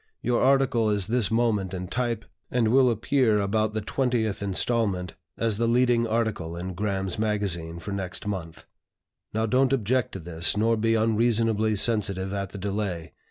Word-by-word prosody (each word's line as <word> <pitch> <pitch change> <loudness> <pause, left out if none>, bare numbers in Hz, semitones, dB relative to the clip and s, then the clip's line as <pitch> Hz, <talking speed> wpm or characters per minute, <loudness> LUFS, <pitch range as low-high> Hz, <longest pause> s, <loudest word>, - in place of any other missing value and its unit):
Your 120 0 +1
article 130 -4 +3
is 105 -2 0
this 115 0 +1
moment 110 -5 0
in 90 0 -5
type, 120 0 -2 0.2
and 120 -3 +1
will 130 +1 +5
appear 115 -1 +2
about 110 +2 0
the 110 -1 -2
20th 110 -4 -1
inst., 100 -2 -1 0.2
as 115 -3 0
the 115 - +2
leading 120 -1 +3
article 110 -7 -2
in 90 +1 -5
'Graham's 95 0 -2
Magazine' 100 -6 -1
for 95 +4 -7
next 95 -2 -4
month. 90 -5 -5 0.7
Now 110 +1 0
don't 130 +3 +2
object 125 0 0
to 95 - -5
this, 85 +3 -1
nor 115 +2 +3
be 115 +1 +1
unreasonably 110 -1 +2
sensitive 100 -3 +1
at 100 -1 -3
the 100 - -9
delay. 95 -4 -3
110 Hz, 160 wpm, -26 LUFS, 95-115 Hz, 0.7 s, will